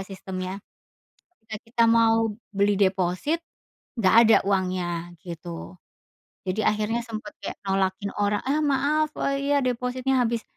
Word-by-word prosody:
sistemnya 190 Hz, -1 st, -6 dB, 0.8 s
ketika 220 Hz, -1 st, -8 dB
kita 230 Hz, 0 st, +2 dB
mau 225 Hz, -1 st, +4 dB, 0.2 s
beli 200 Hz, +1 st, +3 dB
deposit, 190 Hz, -, +1 dB, 0.5 s
nggak 205 Hz, -2 st, +3 dB
ada 225 Hz, -, +7 dB
uangnya 180 Hz, -3 st, -1 dB
gitu, 170 Hz, +1 st, -8 dB, 0.7 s
jadi 200 Hz, +2 st, -1 dB
akhirnya 215 Hz, +2 st, +1 dB
sempet 225 Hz, +6 st, -6 dB
kayak -, -, -6 dB
nolakin 195 Hz, 0 st, -1 dB
orang, 205 Hz, 0 st, +1 dB
"Ah 280 Hz, +3 st, +1 dB
maaf, 300 Hz, +2 st, +1 dB
eee, 275 Hz, +1 st, -1 dB
iya -, -, +4 dB
depositnya 255 Hz, +1 st, 0 dB
habis." 230 Hz, -1 st, -1 dB
215 Hz, 125 wpm, -25 LUFS, 190-250 Hz, 0.8 s, ada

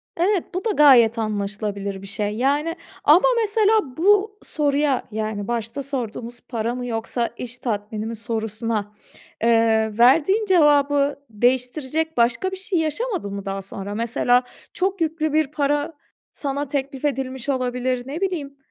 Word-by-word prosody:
Evet, 365 Hz, +1 st, +2 dB
bu 370 Hz, +3 st, -3 dB
da 445 Hz, -, +2 dB
gayet 255 Hz, -, +6 dB
anlaşılabilir 205 Hz, -2 st, -3 dB
bir 195 Hz, -, -10 dB
şey. 205 Hz, +1 st, -2 dB
Yani, 290 Hz, +7 st, 0 dB, 0.3 s
ama 340 Hz, +11 st, +6 dB
mesela 425 Hz, -, +2 dB
bu 410 Hz, +4 st, +3 dB
soruya, 290 Hz, -2 st, 0 dB
yani, 215 Hz, -1 st, -3 dB
başta 235 Hz, +3 st, -3 dB
sorduğumuz 240 Hz, -3 st, -5 dB
para 235 Hz, 0 st, -2 dB
mı, 250 Hz, 0 st, -4 dB
yoksa 235 Hz, 0 st, -2 dB
iş 240 Hz, -1 st, -6 dB
tatmini 215 Hz, -2 st, -3 dB
mi 230 Hz, +1 st, -4 dB
sorusuna, 220 Hz, -1 st, -3 dB, 0.5 s
eee, 225 Hz, -2 st, +3 dB
verdiğin 325 Hz, -, +4 dB
cevabı 290 Hz, -5 st, +3 dB
değiştirecek 260 Hz, +7 st, 0 dB
başka 240 Hz, +10 st, +2 dB
bir 380 Hz, -, -5 dB
şey 380 Hz, -2 st, -1 dB
yaşamadın 320 Hz, -, -2 dB
mı 200 Hz, 0 st, -6 dB
daha 195 Hz, 0 st, -3 dB
sonra? 195 Hz, +1 st, -6 dB
Mesela, 235 Hz, +2 st, +2 dB, 0.3 s
çok 380 Hz, 0 st, -1 dB
yüklü 315 Hz, -1 st, 0 dB
bir 310 Hz, -1 st, +3 dB
para 290 Hz, +2 st, 0 dB, 0.4 s
sana 285 Hz, 0 st, -3 dB
teklif 275 Hz, 0 st, -3 dB
edilmiş 265 Hz, -2 st, -2 dB
olabilir, 250 Hz, -1 st, -1 dB
ne 300 Hz, +6 st, -5 dB
bileyim, 310 Hz, -8 st, -3 dB
260 Hz, 140 wpm, -22 LUFS, 225-310 Hz, 0.5 s, gayet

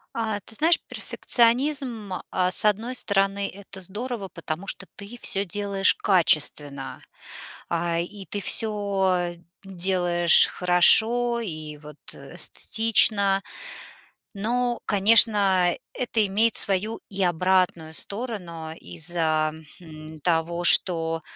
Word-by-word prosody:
А, 220 Hz, -3 st, -4 dB
ты 220 Hz, -, -13 dB
знаешь, 325 Hz, +5 st, +3 dB
перфекционизм, 240 Hz, -3 st, -1 dB, 0.2 s
э, 180 Hz, 0 st, -1 dB
с 200 Hz, -, +3 dB
одной 225 Hz, +5 st, -1 dB
стороны- 195 Hz, -3 st, 0 dB
это 200 Hz, 0 st, -12 dB
здорово, 205 Hz, +3 st, -6 dB
потому 170 Hz, +1 st, -8 dB
что 195 Hz, -, -6 dB
ты 205 Hz, +4 st, -11 dB
всё 195 Hz, +1 st, +2 dB
делаешь 200 Hz, +1 st, -1 dB
качественно. 145 Hz, -6 st, -1 dB, 0.7 s
А, 170 Hz, 0 st, -3 dB
и 195 Hz, +3 st, -8 dB
ты 205 Hz, -, -5 dB
всё 195 Hz, -5 st, 0 dB, 0.3 s
делаешь 175 Hz, -2 st, +5 dB
хорошо 225 Hz, +7 st, +4 dB
и 155 Hz, -7 st, -8 dB
вот 150 Hz, 0 st, -15 dB, 0.2 s
эстетично. 205 Hz, -3 st, -1 dB, 0.9 s
Но, 240 Hz, +4 st, -3 dB
конечно, 200 Hz, -3 st, +3 dB, 0.2 s
это 235 Hz, -4 st, -2 dB
имеет 220 Hz, +4 st, 0 dB
свою 205 Hz, +3 st, -1 dB
и 195 Hz, -1 st, -3 dB
обратную 175 Hz, -2 st, -1 dB
сторону 180 Hz, -9 st, -5 dB
из-за, 160 Hz, -2 st, -3 dB, 0.3 s
хм, 155 Hz, -2 st, -12 dB
того, 170 Hz, +1 st, -2 dB
что, 165 Hz, -2 st, +5 dB
195 Hz, 105 wpm, -22 LUFS, 170-215 Hz, 0.9 s, делаешь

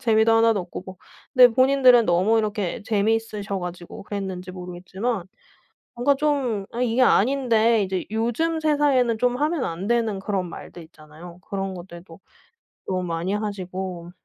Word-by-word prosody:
재미도 220 Hz, -1 st, +3 dB
하나도 225 Hz, -2 st, +4 dB
없고 175 Hz, 0 st, -8 dB
뭐 190 Hz, 0 st, -9 dB, 0.4 s
근데 250 Hz, -1 st, +9 dB
본인들은 255 Hz, -1 st, +5 dB
너무 185 Hz, +6 st, +3 dB
이렇게 210 Hz, -2 st, -2 dB
재미있으셔 210 Hz, -1 st, -1 dB
가지고 175 Hz, 0 st, -8 dB
그랬는지 190 Hz, -3 st, -5 dB
모르겠지만 185 Hz, +4 st, -4 dB, 0.7 s
뭔가 245 Hz, +4 st, +2 dB
좀 270 Hz, -8 st, -1 dB
'아 240 Hz, -, -4 dB
이게 245 Hz, 0 st, +1 dB
아닌데.' 235 Hz, -2 st, +3 dB
이제 190 Hz, -1 st, -3 dB
요즘 240 Hz, +9 st, 0 dB
세상에는 285 Hz, -6 st, +2 dB
좀 245 Hz, +2 st, +1 dB
하면 300 Hz, 0 st, 0 dB
안 170 Hz, +4 st, -4 dB
되는 225 Hz, -4 st, 0 dB
그런 190 Hz, -2 st, -2 dB
말들 170 Hz, 0 st, -10 dB
있잖아요. 160 Hz, +2 st, -14 dB
그런 195 Hz, -1 st, -3 dB
것들도 170 Hz, -1 st, -11 dB, 0.7 s
너무 185 Hz, -1 st, -1 dB
많이 170 Hz, +2 st, -2 dB
하시고 185 Hz, -4 st, -5 dB
210 Hz, 335 characters per minute, -23 LUFS, 185-240 Hz, 0.7 s, 근데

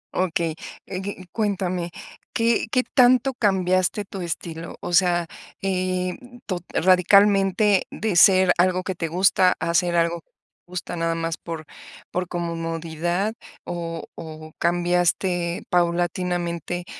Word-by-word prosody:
Okey. 170 Hz, -3 st, 0 dB, 0.3 s
Eh, 185 Hz, -1 st, -5 dB
y 190 Hz, -2 st, -6 dB
cuéntame, 185 Hz, -5 st, -1 dB, 0.4 s
¿qué 230 Hz, 0 st, +1 dB
qué 255 Hz, -, +2 dB
tanto 255 Hz, +1 st, +5 dB
cambiaste 190 Hz, -2 st, +1 dB
tu 195 Hz, -1 st, -7 dB
estilo? 170 Hz, -1 st, -5 dB
O 175 Hz, -, -5 dB
sea, 175 Hz, -1 st, +3 dB, 0.4 s
em, 185 Hz, -1 st, -1 dB, 0.3 s
to 185 Hz, -3 st, -2 dB
radicalmente 195 Hz, +2 st, +4 dB
de 215 Hz, -4 st, -2 dB
ser 185 Hz, +1 st, +6 dB
algo 185 Hz, 0 st, +3 dB
que 190 Hz, -, -3 dB
te 165 Hz, -2 st, -3 dB
gusta 185 Hz, +2 st, +3 dB
a 170 Hz, -, -1 dB
ser 175 Hz, 0 st, +2 dB
algo 170 Hz, 0 st, +1 dB, 0.5 s
gusta 180 Hz, 0 st, -5 dB
nada 165 Hz, 0 st, -1 dB
más 165 Hz, -1 st, -2 dB
por 165 Hz, -2 st, -7 dB, 0.5 s
por 180 Hz, 0 st, -2 dB
comodidad 170 Hz, +3 st, -2 dB, 0.3 s
o 165 Hz, -1 st, -5 dB
o 155 Hz, -1 st, -9 dB
cambiaste 175 Hz, 0 st, +1 dB
paulatinamente? 175 Hz, 0 st, -1 dB
180 Hz, 120 wpm, -23 LUFS, 170-190 Hz, 0.5 s, ser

